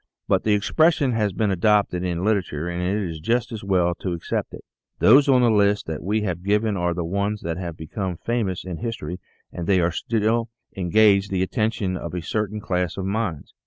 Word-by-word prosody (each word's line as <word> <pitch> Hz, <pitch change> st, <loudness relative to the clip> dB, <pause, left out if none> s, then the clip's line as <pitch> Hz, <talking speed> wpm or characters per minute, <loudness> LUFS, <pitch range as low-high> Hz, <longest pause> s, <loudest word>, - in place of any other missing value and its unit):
But -, -, +2 dB
the 105 Hz, -1 st, +3 dB
expression 150 Hz, -, +2 dB
has 110 Hz, -3 st, 0 dB
been 105 Hz, +2 st, 0 dB
adopted 95 Hz, -1 st, +2 dB
in 90 Hz, -1 st, -2 dB
literature 90 Hz, -7 st, 0 dB
and 85 Hz, 0 st, -3 dB
it 95 Hz, +2 st, -1 dB
is 80 Hz, -2 st, -6 dB
just 115 Hz, +8 st, 0 dB
as 110 Hz, -2 st, -6 dB
well 90 Hz, -3 st, +2 dB
to 90 Hz, -, -3 dB
accept 85 Hz, -, -3 dB
it. -, -, -11 dB, 0.3 s
Those 140 Hz, +6 st, +6 dB
on 130 Hz, -2 st, +5 dB
the 120 Hz, -, +4 dB
list 105 Hz, -1 st, +2 dB
that 80 Hz, -1 st, -5 dB
we 105 Hz, +4 st, 0 dB
have 90 Hz, -4 st, -3 dB
given 105 Hz, +2 st, +1 dB
are 90 Hz, -2 st, 0 dB
the 85 Hz, -1 st, -2 dB
ones 100 Hz, +4 st, -1 dB
that 85 Hz, 0 st, -3 dB
have 85 Hz, -3 st, -5 dB
become 90 Hz, +3 st, -4 dB
famous 110 Hz, -5 st, -2 dB
in 90 Hz, -3 st, -5 dB
history 115 Hz, -5 st, -5 dB, 0.3 s
and 85 Hz, -1 st, -5 dB
they 90 Hz, -4 st, +3 dB
still 115 Hz, +4 st, 0 dB, 0.3 s
engage 100 Hz, +2 st, +4 dB
the 95 Hz, -2 st, 0 dB
attention 105 Hz, -2 st, -1 dB
of 85 Hz, 0 st, -6 dB
a 90 Hz, -, -2 dB
certain 105 Hz, +2 st, -2 dB
class 90 Hz, -4 st, -2 dB
of 95 Hz, -, -3 dB
minds. 100 Hz, -6 st, -3 dB
100 Hz, 200 wpm, -23 LUFS, 90-110 Hz, 0.3 s, Those